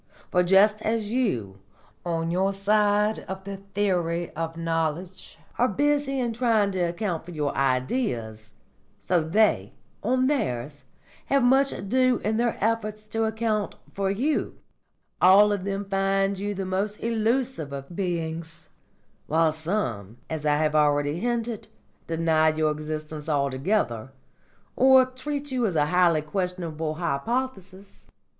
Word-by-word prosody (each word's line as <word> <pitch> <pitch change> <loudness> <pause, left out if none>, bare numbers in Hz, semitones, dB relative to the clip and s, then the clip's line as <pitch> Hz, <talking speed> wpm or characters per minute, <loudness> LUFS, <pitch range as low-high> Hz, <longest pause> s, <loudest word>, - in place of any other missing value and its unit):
For 180 - +4
just 200 +4 +4
as 220 -1 -1
you, 120 - -1 0.4
on 165 -1 -1
your 190 +3 +1
side 210 +1 +2
of 190 0 -6
the 200 0 -6 0.2
theory 175 -4 0
of 165 +1 -4
knowledge, 165 +2 -3 0.2
are 245 - +4
busy 285 +4 +1
in 240 -2 -1
trying 225 -4 +2
to 190 - -3
account 175 0 -1
for 170 - -13
your 150 -4 -2
Ideas, 125 - -1 0.5
so 175 -2 +1
they, 160 - +2 0.3
on 255 +4 +1
theirs, 145 - -2 0.4
have 275 -2 +3
much 270 +2 +4
ado 250 +5 +1
in 220 +1 0
their 235 0 0
efforts 215 -1 -1
to 225 0 0
account 220 -2 -1 0.2
for 195 -1 -1
you; 255 +11 -1 0.6
all 200 +3 +7
of 200 -2 -2
them 200 0 -2
find 195 0 0
you 205 +1 -3
the 195 0 -3
most 195 +3 -2
illusive 230 - 0
of 140 +4 -7
beings, 165 -3 -4 0.6
while 160 +1 +3
some, 155 - -3
as 155 -1 -2
I 150 0 +3
have 155 0 +1
already 145 +1 +2
hinted, 235 -1 -2 0.4
deny 160 -1 +2
your 155 0 +1
existence 155 0 -5
altogether, 140 - 0 0.7
or 260 0 +6
treat 280 +3 -5
you 250 -3 +1
as 185 - -3
a 150 -1 +3
highly 170 -1 +3
questionable 165 -3 -3
hypothesis. 195 - -4
190 Hz, 135 wpm, -25 LUFS, 155-220 Hz, 0.7 s, all